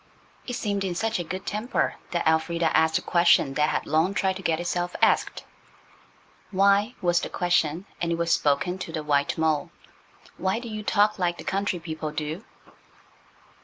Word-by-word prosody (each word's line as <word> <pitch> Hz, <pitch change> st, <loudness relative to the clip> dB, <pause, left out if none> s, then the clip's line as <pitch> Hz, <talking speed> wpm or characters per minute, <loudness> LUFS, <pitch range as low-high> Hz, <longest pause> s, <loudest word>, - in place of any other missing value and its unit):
It 245 Hz, -, -3 dB
seemed 205 Hz, -4 st, -2 dB
in 185 Hz, -2 st, -2 dB
such 225 Hz, +3 st, -1 dB
a -, -, -2 dB
good 185 Hz, +3 st, -6 dB
temper 215 Hz, +4 st, -1 dB, 0.2 s
that 175 Hz, -2 st, -1 dB
Elfrida 165 Hz, +1 st, +1 dB
asked 160 Hz, 0 st, +4 dB
a -, -, -5 dB
question 170 Hz, -5 st, +4 dB
that 150 Hz, +2 st, +2 dB
had -, -, -1 dB
long 160 Hz, +6 st, +1 dB
tried 190 Hz, -1 st, +1 dB
to -, -, -8 dB
get 165 Hz, -3 st, 0 dB
itself 175 Hz, 0 st, -2 dB
asked. -, -, +2 dB, 1.1 s
"Why," 200 Hz, +4 st, +3 dB
was 175 Hz, -1 st, +3 dB
the -, -, -5 dB
question, 175 Hz, -1 st, 0 dB, 0.2 s
and 170 Hz, -1 st, 0 dB
it 165 Hz, -, 0 dB
was 170 Hz, 0 st, +1 dB
spoken 155 Hz, +6 st, +1 dB
to 170 Hz, -, -6 dB
the 155 Hz, -2 st, -4 dB
white 145 Hz, -1 st, +1 dB
mole,–"why 160 Hz, +4 st, -3 dB
do 235 Hz, 0 st, -6 dB
you 215 Hz, -1 st, -5 dB
talk 210 Hz, 0 st, +2 dB
like 175 Hz, -1 st, 0 dB
the -, -, -8 dB
country 195 Hz, -1 st, -1 dB
people 160 Hz, -2 st, -5 dB
do?" 155 Hz, +5 st, -4 dB
175 Hz, 175 wpm, -25 LUFS, 160-195 Hz, 1.1 s, asked